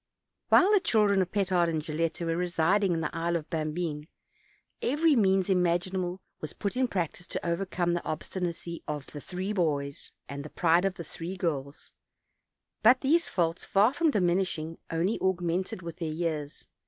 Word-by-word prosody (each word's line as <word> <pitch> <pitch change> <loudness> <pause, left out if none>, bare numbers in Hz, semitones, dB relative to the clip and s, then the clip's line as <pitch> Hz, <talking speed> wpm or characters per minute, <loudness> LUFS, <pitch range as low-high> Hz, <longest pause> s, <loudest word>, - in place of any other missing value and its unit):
While 375 +3 +6
the 415 - +6
children 210 - +3
of 185 - -2
Pe 200 -2 +1
tard 180 -2 +2
and 160 -1 0
Gilletta 165 +2 -2
were 165 0 0
resid 180 +3 +2
ing 190 -3 +2
in 165 - -1
the 150 - -3
Isle 170 +1 0
of 160 -2 -3
Bambine, 155 -1 -2 0.7
every 300 +3 +3
means 190 -4 +3
imaginable 180 0 0 0.2
was 155 - -6
put 200 +3 -3
in 255 0 +2
practice 175 -3 -3
to - - -4
overcome 175 0 0
the 175 - -2
obstinacy 170 +1 -4
of 150 -2 -4
tie 145 - -9
three 185 +6 -4
boys 145 -7 -1 0.2
and 140 0 -6
the 155 - -8
pride 170 +3 +3
of 195 -1 0
the 170 - -6
three 170 +4 -6
girls; 145 -5 -3 0.9
but 245 +3 +6
these 325 +5 +3
faults, 165 -1 0
far 210 +6 +3
from 335 +1 +2
diminishing, 175 - 0
only 170 +6 0
augmented 185 0 -1
with 170 0 -7
their 165 -3 -3
years. 155 -2 -3
175 Hz, 175 wpm, -29 LUFS, 165-190 Hz, 0.9 s, While